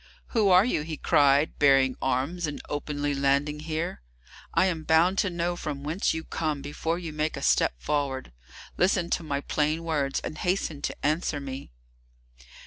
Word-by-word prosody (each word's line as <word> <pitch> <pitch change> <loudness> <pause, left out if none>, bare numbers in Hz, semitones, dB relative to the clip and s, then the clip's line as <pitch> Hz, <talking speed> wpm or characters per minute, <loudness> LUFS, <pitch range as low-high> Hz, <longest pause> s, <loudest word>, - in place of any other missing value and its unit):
"Who 215 -5 +2
are 185 +2 +6
you," 245 - 0
he 155 0 -5
cried, 145 +2 +3
"bearing 135 -2 +5
arms 140 +7 -1
and 145 - -5
openly 145 0 -2
landing 140 +2 +1
here? 155 - -3 0.5
I - - +3
am 170 -4 -1
bound 165 +5 +3
to 200 - +2
know 175 0 -1
from 145 -5 -5
whence 160 +7 0
you 160 - -3
come 155 -4 -3
before 160 +3 -2
you 170 -3 -6
make 155 +1 -1
a - - -6
step - - +3
forward. 135 - -2 0.5
Listen 180 -1 +2
to - - +1
my 145 -3 -2
plain 155 +3 0
words, 145 -4 0
and 155 - -6
hasten 180 -5 -1
to - - -4
answer 155 0 0
me." 135 - -7
150 Hz, 170 wpm, -27 LUFS, 140-170 Hz, 0.5 s, are